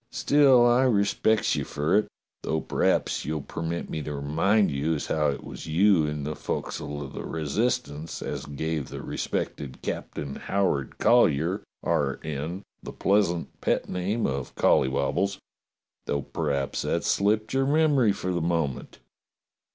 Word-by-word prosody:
"Still 135 Hz, -4 st, +5 dB
I 120 Hz, +2 st, +4 dB
respec's 110 Hz, -1 st, +2 dB
you -, -, -1 dB
fer 75 Hz, +5 st, 0 dB
it, 105 Hz, -, +3 dB, 0.3 s
though 80 Hz, -, -1 dB
p'raps -, -, 0 dB
you'll 75 Hz, 0 st, -3 dB
permit 85 Hz, +3 st, -4 dB
me 80 Hz, -, -4 dB
to 75 Hz, 0 st, -5 dB
remind 80 Hz, +9 st, +2 dB
you 75 Hz, +4 st, 0 dB
as 75 Hz, -, -3 dB
how 75 Hz, -1 st, +1 dB
it 70 Hz, -, -4 dB
was -, -, -8 dB
you 85 Hz, 0 st, +4 dB
in 75 Hz, -1 st, -3 dB
the 75 Hz, +2 st, -3 dB
fo'csle 75 Hz, -1 st, -4 dB
of 65 Hz, -, -9 dB
the -, -, -5 dB
Resistance 80 Hz, -, -2 dB
as -, -, -5 dB
gave 75 Hz, 0 st, -3 dB
the -, -, -7 dB
respected 65 Hz, -3 st, -4 dB
Captain 70 Hz, -1 st, -4 dB
Howard 90 Hz, -9 st, -1 dB
Collyer, 90 Hz, -4 st, +3 dB, 0.2 s
R. 70 Hz, -2 st, 0 dB
N., 80 Hz, +6 st, -4 dB, 0.2 s
the -, -, -7 dB
pleasant 95 Hz, -4 st, 0 dB
pet -, -, 0 dB
name 100 Hz, +6 st, -1 dB
of 65 Hz, -1 st, -3 dB
Colly -, -, +4 dB
wobbles. 85 Hz, +9 st, 0 dB, 0.7 s
Though 70 Hz, -1 st, -1 dB
p'raps 70 Hz, -4 st, -2 dB
that's -, -, -1 dB
slipped 110 Hz, +3 st, +1 dB
your 135 Hz, 0 st, +2 dB
memory 145 Hz, -6 st, +4 dB
for 90 Hz, -2 st, -3 dB
the 85 Hz, -, -1 dB
moment." 80 Hz, -5 st, -2 dB
80 Hz, 150 wpm, -26 LUFS, 75-105 Hz, 0.7 s, Still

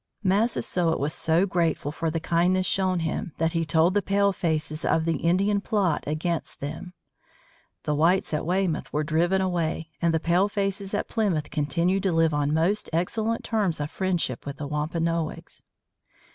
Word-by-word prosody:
Massasoit 190 Hz, -4 st, +1 dB
was 145 Hz, +2 st, -1 dB
so 165 Hz, +4 st, +2 dB
grateful 170 Hz, -6 st, 0 dB
for 165 Hz, +1 st, -2 dB
the 165 Hz, +1 st, -2 dB
kindness 180 Hz, +3 st, +1 dB
shown 185 Hz, -2 st, +1 dB
him 165 Hz, +2 st, -3 dB
that 165 Hz, 0 st, +1 dB
he 165 Hz, -1 st, 0 dB
told 160 Hz, +3 st, +3 dB
the 205 Hz, -, +2 dB
palefaces 175 Hz, -6 st, 0 dB
of 160 Hz, -, +1 dB
the 165 Hz, -2 st, +1 dB
Indian 195 Hz, +6 st, +1 dB
plot 200 Hz, -7 st, 0 dB
against 160 Hz, +2 st, -2 dB
them. 160 Hz, +6 st, -6 dB, 0.9 s
The 150 Hz, -, 0 dB
whites 165 Hz, +4 st, +2 dB
at 150 Hz, -, 0 dB
Weymouth 180 Hz, -1 st, -1 dB
were 150 Hz, -, 0 dB
driven 170 Hz, +5 st, +1 dB
away 165 Hz, -3 st, -1 dB
and 170 Hz, -1 st, +3 dB
the 160 Hz, -, +1 dB
palefaces 195 Hz, +3 st, 0 dB
at -, -, -2 dB
Plymouth 185 Hz, -10 st, -1 dB
continued 170 Hz, +6 st, 0 dB
to 190 Hz, -1 st, +1 dB
live 165 Hz, -1 st, +2 dB
on 145 Hz, 0 st, +1 dB
most 170 Hz, +7 st, +1 dB
excellent 220 Hz, +7 st, -1 dB
terms 205 Hz, -8 st, 0 dB
of 145 Hz, 0 st, -3 dB
friendship 175 Hz, -9 st, -1 dB
with 140 Hz, 0 st, -6 dB
the 150 Hz, -, -5 dB
Wampanoags. 165 Hz, +2 st, -2 dB
170 Hz, 160 wpm, -26 LUFS, 155-190 Hz, 0.9 s, told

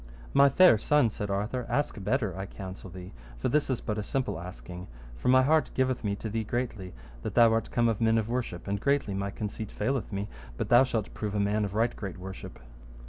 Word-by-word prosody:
My 140 Hz, 0 st, +7 dB
fair 155 Hz, -, +6 dB
son, 145 Hz, -2 st, +3 dB
said 105 Hz, -1 st, -4 dB
Arthur, 105 Hz, +5 st, -2 dB
ask 140 Hz, -8 st, -1 dB
better, 110 Hz, -1 st, 0 dB
I 95 Hz, +1 st, -5 dB
counsel 95 Hz, -1 st, -8 dB
thee, 90 Hz, +1 st, -10 dB, 0.2 s
for -, -, -1 dB
this 150 Hz, -1 st, +1 dB
is 130 Hz, -, -1 dB
but 105 Hz, 0 st, -2 dB
a -, -, -2 dB
simple 130 Hz, -5 st, -2 dB
asking; 90 Hz, 0 st, -8 dB, 0.3 s
for -, -, -5 dB
my 130 Hz, +1 st, +6 dB
heart 155 Hz, +3 st, +3 dB
giveth 130 Hz, -1 st, +1 dB
me 100 Hz, -1 st, 0 dB
to 110 Hz, -, -6 dB
thee 110 Hz, +1 st, -2 dB
greatly, 110 Hz, -5 st, -3 dB, 0.3 s
that -, -, -5 dB
thou 115 Hz, -1 st, +6 dB
art 115 Hz, -, 0 dB
come 120 Hz, -1 st, +2 dB
of 115 Hz, -1 st, 0 dB
men 115 Hz, 0 st, +4 dB
of 110 Hz, -1 st, 0 dB
worship, 115 Hz, -8 st, -3 dB
and 100 Hz, 0 st, -2 dB
greatly 140 Hz, -7 st, +1 dB
my 100 Hz, +1 st, -2 dB
conceit 105 Hz, +1 st, -5 dB
faileth 130 Hz, +2 st, -2 dB
me 100 Hz, +1 st, -3 dB, 0.3 s
but -, -, -3 dB
thou 120 Hz, +2 st, +7 dB
shalt 115 Hz, -5 st, -2 dB
prove 105 Hz, -1 st, -4 dB
a -, -, +1 dB
man 105 Hz, +1 st, +1 dB
of 100 Hz, 0 st, -6 dB
right 115 Hz, +2 st, +1 dB
great 100 Hz, -4 st, -6 dB
worship. 95 Hz, +1 st, -8 dB
110 Hz, 225 wpm, -29 LUFS, 100-125 Hz, 0.3 s, My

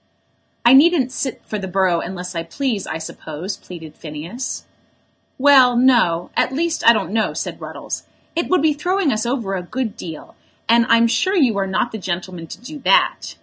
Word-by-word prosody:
"I 240 Hz, -, +7 dB
needn't 280 Hz, -2 st, +5 dB
sit 265 Hz, -1 st, -4 dB
for 215 Hz, -, -4 dB
the 190 Hz, -, -5 dB
borough 185 Hz, -2 st, +1 dB
unless 180 Hz, 0 st, -6 dB
I 165 Hz, -, -2 dB
please, 220 Hz, +4 st, -3 dB
I 160 Hz, -, -3 dB
suppose," 160 Hz, +3 st, -6 dB
pleaded 165 Hz, -4 st, -11 dB
Phineas. 165 Hz, -, -6 dB, 0.7 s
"Well, 260 Hz, -3 st, +6 dB
no; 235 Hz, -10 st, +3 dB
at -, -, +1 dB
least 325 Hz, +4 st, -1 dB
I -, -, +11 dB
don't 215 Hz, -6 st, -1 dB
know," 220 Hz, 0 st, 0 dB
said -, -, -5 dB
Ruddles. -, -, -6 dB, 0.3 s
"It 340 Hz, -, -1 dB
would 365 Hz, -5 st, +2 dB
be 310 Hz, -1 st, +4 dB
throwing 360 Hz, +1 st, 0 dB
us 215 Hz, +2 st, -2 dB
over 235 Hz, -6 st, -2 dB
a 185 Hz, -, -2 dB
good 225 Hz, +4 st, -4 dB
deal, 160 Hz, -3 st, -9 dB, 0.3 s
and 230 Hz, 0 st, +4 dB
I'm 230 Hz, 0 st, +5 dB
sure 240 Hz, -, +1 dB
you 260 Hz, -, +3 dB
are 195 Hz, -, -1 dB
not 190 Hz, +5 st, -1 dB
the 220 Hz, -, -6 dB
gentleman 180 Hz, -2 st, -5 dB
to -, -, -9 dB
do 295 Hz, +5 st, -9 dB
that. -, -, +2 dB
230 Hz, 190 wpm, -20 LUFS, 180-265 Hz, 0.7 s, I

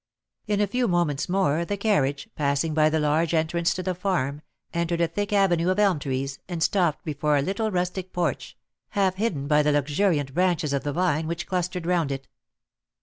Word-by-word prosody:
In 205 Hz, -1 st, +1 dB
a 205 Hz, -, +4 dB
few 245 Hz, +4 st, 0 dB
moments 175 Hz, -5 st, 0 dB
more, 170 Hz, -4 st, +2 dB
the 200 Hz, +4 st, -3 dB
carriage, 145 Hz, -10 st, +1 dB
passing 145 Hz, +2 st, 0 dB
by 155 Hz, 0 st, +4 dB
the 160 Hz, 0 st, +1 dB
large 155 Hz, +3 st, +1 dB
entrance 165 Hz, +2 st, +1 dB
to 185 Hz, -, -4 dB
the 185 Hz, -, -1 dB
farm, 170 Hz, -6 st, -1 dB, 0.3 s
entered 170 Hz, 0 st, -1 dB
a 170 Hz, -, +3 dB
thick 205 Hz, +6 st, -3 dB
avenue 185 Hz, -4 st, +3 dB
of 185 Hz, -, +1 dB
elm 200 Hz, -6 st, +3 dB
trees, 135 Hz, 0 st, -3 dB
and 170 Hz, -3 st, -1 dB
stopped 175 Hz, -5 st, +1 dB
before 150 Hz, -1 st, +1 dB
a -, -, +2 dB
little 200 Hz, +6 st, -1 dB
rustic 180 Hz, -1 st, -2 dB
porch, 170 Hz, -6 st, -2 dB, 0.4 s
half 190 Hz, -2 st, +2 dB
hidden 190 Hz, -10 st, -1 dB
by 150 Hz, 0 st, +4 dB
the 150 Hz, 0 st, +2 dB
luxuriant 145 Hz, 0 st, +1 dB
branches 175 Hz, -4 st, +1 dB
of 140 Hz, -, -1 dB
the 145 Hz, -, -2 dB
vine 160 Hz, -2 st, +1 dB
which 170 Hz, +1 st, -3 dB
clustered 180 Hz, -1 st, -2 dB
round 170 Hz, -5 st, +1 dB
it. 135 Hz, 0 st, -5 dB
170 Hz, 195 wpm, -25 LUFS, 150-185 Hz, 0.4 s, a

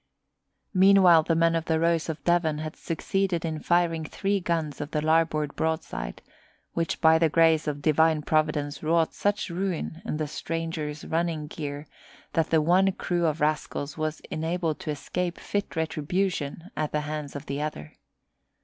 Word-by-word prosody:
Meanwhile 185 Hz, -3 st, +7 dB
the 165 Hz, +1 st, 0 dB
men 165 Hz, 0 st, +3 dB
of 165 Hz, -1 st, -1 dB
the 160 Hz, -1 st, +1 dB
Rose 165 Hz, 0 st, +1 dB
of 155 Hz, -3 st, -5 dB
Devon 170 Hz, -2 st, +2 dB
had 155 Hz, +1 st, -5 dB
succeeded 185 Hz, 0 st, -1 dB
in 160 Hz, -1 st, -3 dB
firing 170 Hz, -1 st, +1 dB
three 195 Hz, +5 st, -1 dB
guns 165 Hz, -5 st, -2 dB
of 145 Hz, -, -4 dB
the 155 Hz, -, -1 dB
larboard 155 Hz, -1 st, +1 dB
broadside, 160 Hz, -, -3 dB, 0.5 s
which 165 Hz, -1 st, -1 dB
by 160 Hz, -1 st, +6 dB
the 165 Hz, -1 st, +3 dB
grace 160 Hz, -1 st, +4 dB
of 145 Hz, -1 st, -3 dB
Divine 160 Hz, 0 st, +3 dB
Providence 150 Hz, -2 st, 0 dB
wrought 160 Hz, +1 st, +2 dB
such 205 Hz, -2 st, -1 dB
ruin 175 Hz, -2 st, -3 dB
in 225 Hz, -, -3 dB
the 155 Hz, -1 st, -2 dB
stranger's 160 Hz, -1 st, -4 dB
running 165 Hz, -2 st, -1 dB
gear 145 Hz, -1 st, -6 dB, 0.5 s
that 165 Hz, -1 st, +1 dB
the 160 Hz, -2 st, +3 dB
one 185 Hz, +4 st, +4 dB
crew 175 Hz, -2 st, 0 dB
of 155 Hz, 0 st, -1 dB
rascals 150 Hz, -1 st, -1 dB
was 155 Hz, 0 st, -3 dB
enabled 160 Hz, -1 st, -1 dB
to -, -, -6 dB
escape 170 Hz, +4 st, -3 dB
fit 205 Hz, -1 st, -3 dB
retribution 160 Hz, +1 st, -2 dB
at 155 Hz, -1 st, -2 dB
the 150 Hz, -, 0 dB
hands 150 Hz, -1 st, -5 dB
of 145 Hz, +1 st, -6 dB
the 140 Hz, 0 st, -3 dB
other. 115 Hz, -, -5 dB
160 Hz, 165 wpm, -27 LUFS, 150-170 Hz, 0.5 s, Meanwhile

